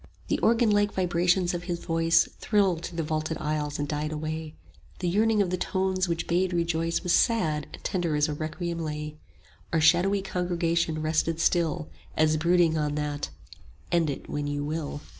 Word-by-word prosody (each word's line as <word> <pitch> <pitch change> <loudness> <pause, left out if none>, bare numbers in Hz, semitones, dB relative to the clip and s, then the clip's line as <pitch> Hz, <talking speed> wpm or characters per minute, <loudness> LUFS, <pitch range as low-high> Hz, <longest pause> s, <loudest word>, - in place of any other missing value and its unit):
The - - +1
organ 230 -1 +3
like 205 0 +3
vibrations 180 0 +2
of 175 0 -4
his 175 -2 -2
voice 165 0 +4
85 - - -20
Thrilled 195 -6 +2
through 175 - -6
the 165 - 0
vaulted 155 +1 -2
aisles 150 -1 -2
and 145 - -2
died 150 +1 -2
away; 155 0 -4 0.4
The 180 - -2
yearning 210 +3 +3
of 180 - -3
the 185 - 0
tones 190 0 0
which 170 0 -1
bade 180 +2 +1
rejoice 165 -1 0
Was 180 - +1
sad 160 -10 +2
and - - -11
tender 175 -5 -1
as 150 0 +2
a 150 - -2
requiem 165 +3 -4
lay: 150 -1 -4 0.5
Our 165 - +2
shadowy 180 +5 +4
congregation 170 -3 -1
rested 160 +1 0
still 160 - +1 0.3
As 155 0 +3
brooding 170 0 +3
on 150 -1 -1
that 145 - -3 0.6
"End 170 -3 +2
it 140 - -5
when 145 0 -3
you 145 0 -2
will." 150 -1 -4
165 Hz, 180 wpm, -27 LUFS, 155-180 Hz, 0.6 s, voice